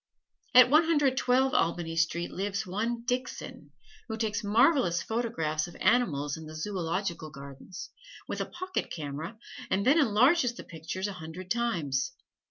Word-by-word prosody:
At 250 0 +9
One 310 +3 +6
Hundred 290 -5 +3
Twelve 260 +1 +2
Albany 165 0 0
Street 165 +1 0
lives 200 +2 -2
one 230 +6 -2
Dixon, 250 +1 -4 0.4
who 220 -1 -4
takes 220 -1 -1
marvelous 215 - +3
photographs 175 -10 -1
of 175 - -12
animals 160 - +2
in 160 -1 -9
the 155 - -9
Zoological 170 -1 -3
Gardens, 140 +4 -10 0.4
with - - -3
a - - -3
pocket 370 +1 -4
camera, 155 +6 -6 0.3
and 195 +2 +1
then 290 +5 +5
enlarges 250 +2 +4
the - - -8
pictures 165 +4 -5
a 205 - -5
hundred 180 +1 -9
times. 175 - 0
200 Hz, 150 wpm, -29 LUFS, 165-245 Hz, 0.4 s, At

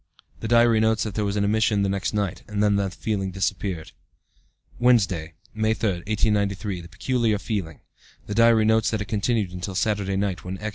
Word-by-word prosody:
(The 115 - -4
diary 115 -1 +4
notes 110 0 +2
that 110 - -4
there 105 - -1
was 100 0 -1
an 105 - +1
emission 105 0 +2
the - - +1
next 100 0 -1
night, 100 -4 -2
and 105 -1 -1
that 105 -1 +3
the 100 -1 0
feeling 95 0 -3
disappeared.) 95 -2 -3 0.9
"Wednesday, 95 -10 +2 0.2
May 110 0 +1
3, 110 - 0
1893. 100 0 -1
The 85 - -11
peculiar 115 +1 0
feeling. 100 -8 -4 0.4
(The 105 - -4
diary 115 0 +5
notes 110 0 +3
that 110 -2 -2
it - - -3
continued 105 -1 0
until 90 +1 -6
Saturday 100 -1 0
night, 95 -2 -2
when 95 +1 -5
X. 110 +2 -4
105 Hz, 190 wpm, -24 LUFS, 95-110 Hz, 0.9 s, diary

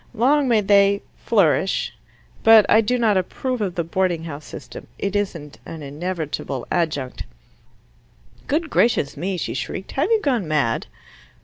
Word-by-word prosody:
Long 270 +5 +3
may 230 -3 +3
they, 200 0 +4
flourish. 195 -3 +1 0.5
But 225 -1 +7
I 220 - +5
do 245 +3 0
not 220 -4 +3
approve 250 +6 -2
of 190 -4 -2
the 170 - 0
boarding 175 0 -1
house 150 -2 -7
system. 130 - -10
It 200 0 -3
isn't 165 -8 -3
an 160 -2 -8
inevitable 150 -3 -4
adjunct 150 -7 -1 0.7
" 95 - -31
"Good 310 +2 -1
gracious 220 -11 +2
me!" 185 +5 -3
she - - -3
shrieked. 190 - -5
"Have 300 +8 0
you 450 -1 +4
gone 250 - 0
mad?" 145 -7 0
190 Hz, 150 wpm, -22 LUFS, 155-225 Hz, 0.7 s, But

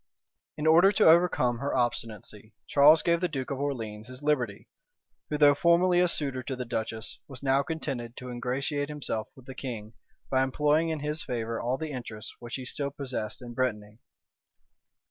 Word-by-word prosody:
{1491.} - - -54
In 150 - -3
order 170 +5 +7
to 165 -5 +7
overcome 125 -9 +1
her 140 +2 -2
obstinacy, 110 -3 -3
Charles 150 +3 +6
gave 170 0 +2
the 180 - +2
duke 135 -5 -4
of 135 - -3
Orleans 115 -6 -4
his 130 +2 -11
liberty; 125 -9 0 0.6
who, 150 - -1
though 145 -1 +7
formerly 175 +4 +4
a 180 - +4
suitor 140 -6 -1
to 130 +1 -4
the 125 0 -5
duchess, 110 -1 -4
was 135 -1 -10
now 135 0 +3
contented 135 -7 -4
to 125 0 -7
ingratiate 135 +4 -2
himself 140 -7 -3
with 130 - -16
the 130 - -8
king, 115 -5 -6 0.4
by 130 -1 +3
employing 150 +4 +2
in 160 -2 -2
his 150 +1 -3
favor 115 -2 -3
all 125 +2 0
the 155 +1 -5
interest 120 -5 -6
which 120 -1 -6
he 130 - -6
still 140 +2 -2
possessed 130 -5 -4
in 120 -1 -8
Brittany. 110 -4 -2
130 Hz, 185 wpm, -28 LUFS, 120-150 Hz, 0.6 s, order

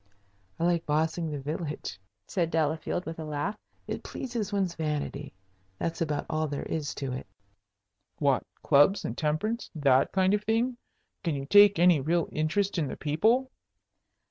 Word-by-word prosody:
"I - - -1
like 170 -1 +2
'bossing' 160 +2 0
the 150 - -3
village," 145 - -4 0.3
said 170 -4 -1
Delafield, 160 +2 -1
with 165 0 -6
a - - -4
laugh. 155 +7 -2 0.3
"It - - -4
pleases 235 -6 -4
one's 195 -4 0
vanity. 150 -3 -3 0.5
That's 165 - -3
about 150 -3 -1
all 155 0 0
there 145 -1 -4
is 150 -2 -3
to 135 -2 -3
it." 130 - -6 0.9
"What, 140 -3 +2 0.2
clubs 145 +7 +4
and - - -3
temperance, 170 +10 -1
that 140 -3 +3
kind 190 0 +3
of 210 0 +1
thing? 230 +3 +1 0.5
Can 165 -5 0
you 135 -1 -4
take 205 +4 +7
any 175 -3 +5
real 165 +4 +1
interest 180 +5 0
in 150 - 0
the - - -6
people?" 220 - +2
160 Hz, 160 wpm, -28 LUFS, 150-195 Hz, 0.9 s, take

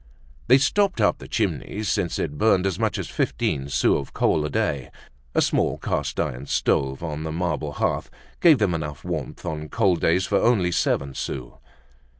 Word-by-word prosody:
They 130 - +7
stopped 190 - +2
up 105 - +2
the - - -10
chimney 105 - -2
since 100 -5 0
it 75 -2 -3
burned 100 -4 +3
as 95 -3 -1
much - - 0
as - - -4
fifteen 70 +1 -1
sous 65 - +2
of 70 - -8
coal 75 - +2
a 75 - -2
day. 70 -2 -1 0.5
A - - +4
small - - +1
cast 70 0 -2
iron 65 +3 -2
stove 65 +3 0
on 75 -2 -4
the 80 0 -4
marble 90 +2 -2
hearth - - -1 0.3
gave 160 -4 +6
them 105 -6 +1
enough 75 -4 -4
warmth - - -5
on 75 -1 -4
cold 95 -7 +2
days 90 +3 +2
for - - +2
only 100 -7 +3
seven 70 -5 0
sous. 65 -3 -5
80 Hz, 180 wpm, -24 LUFS, 70-105 Hz, 0.5 s, They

